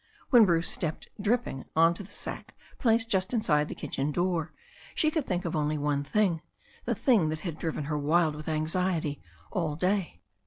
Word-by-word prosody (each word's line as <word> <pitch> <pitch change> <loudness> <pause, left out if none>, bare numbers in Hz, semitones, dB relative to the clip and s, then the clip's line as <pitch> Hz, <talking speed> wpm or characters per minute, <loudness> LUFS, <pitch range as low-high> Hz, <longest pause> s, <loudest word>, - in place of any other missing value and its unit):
When 240 -4 +8
Bruce 170 -3 +2
stepped 160 -2 -3
dripping 210 - 0
on 165 +1 +5
to 170 - -7
the 200 - -11
sack - - -7 0.2
placed 230 -1 +3
just 190 +4 +1
inside 150 -9 +2
the - - -6
kitchen 140 +2 -2
door, 175 0 0 0.4
she 310 - +2
could 310 -4 -1
think 180 -1 -1
of 165 - -2
only 150 0 0
one 145 -1 0
thing, 175 0 +1 0.4
the - - 0
thing 220 - +3
that 155 0 -3
had 165 -4 -5
driven 160 -2 -2
her 150 +1 -2
wild 155 +2 +3
with 150 0 -8
anxiety 155 -1 0 0.3
all 160 -5 -1
day. 185 +1 -1
165 Hz, 185 wpm, -29 LUFS, 155-195 Hz, 0.4 s, When